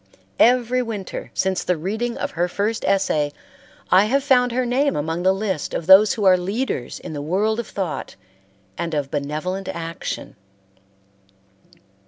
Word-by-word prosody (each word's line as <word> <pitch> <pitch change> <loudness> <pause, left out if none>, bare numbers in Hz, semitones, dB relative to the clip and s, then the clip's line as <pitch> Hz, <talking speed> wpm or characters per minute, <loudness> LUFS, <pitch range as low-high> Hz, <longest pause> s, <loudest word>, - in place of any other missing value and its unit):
Every 250 +1 +4
winter 215 -6 -5
since 190 -1 0
the 180 - 0
reading 220 +8 -3
of - - -3
her 175 +1 0
first 210 +5 -2
essay 155 -7 +1 0.6
I 190 +3 +6
have 270 +5 +1
found 250 -3 +3
her 250 +1 0
name 270 +4 +1
among 160 +3 -2
the 185 +1 +4
list 190 -5 -2
of 165 - -3
those 190 +4 +7
who 215 - -3
are 185 -1 +6
leaders 195 - -3
in - - -8
the 145 - -4
world 205 +9 0
of 235 - -4
thought 190 -5 -4 0.6
and 165 -2 -2
of 140 -2 -2
benevolent 155 +7 -3
action. 165 0 -5
190 Hz, 155 wpm, -22 LUFS, 170-230 Hz, 0.6 s, those